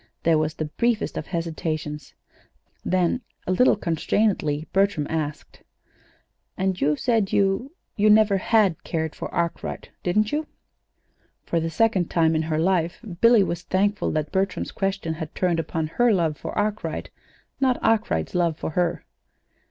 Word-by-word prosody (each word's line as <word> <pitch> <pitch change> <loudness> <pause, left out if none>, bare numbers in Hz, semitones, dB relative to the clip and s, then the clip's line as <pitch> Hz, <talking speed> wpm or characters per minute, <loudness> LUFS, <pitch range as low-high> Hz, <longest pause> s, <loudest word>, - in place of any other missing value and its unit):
There 165 -2 +4
was 155 0 -1
the 155 - -3
briefest 230 +9 -1
of - - -4
hesitations; 155 -4 -4 0.7
then, 185 +6 +1 0.2
a - - -1
little 250 +8 +4
constrainedly, 165 -3 0
Bertram 195 -6 +2
asked: 155 -2 -4 1.0
"And 190 -1 -1
you 150 +2 +3
said 225 - +1
you 200 +9 +1 0.2
you 210 +1 +3
never 210 -2 +5
had 195 -4 +2
cared 160 -1 -2
for - - -6
Arkwright, 170 -1 -3
didn't 210 +4 +1
you?" 305 +1 -1 1.0
For 170 - 0
the 165 0 -2
second 200 -2 +1
time 160 -1 +2
in 155 - +2
her 155 - 0
life 170 0 +1 0.2
Billy 230 -3 +6
was 175 -2 -3
thankful 200 +3 0
that 155 -1 -2
Bertram's 195 +1 -1
question 195 -4 -2
had 160 -1 -7
turned 175 -3 +1
upon 160 0 -2
her 240 +10 +2
love 165 -6 +1
for - - -6
Arkwright, 210 0 -2 0.5
not 260 -2 +2
Arkwright's 80 - +1
love 170 -3 +1
for - - -4
her. 175 +1 -1
180 Hz, 150 wpm, -24 LUFS, 160-205 Hz, 1.0 s, Billy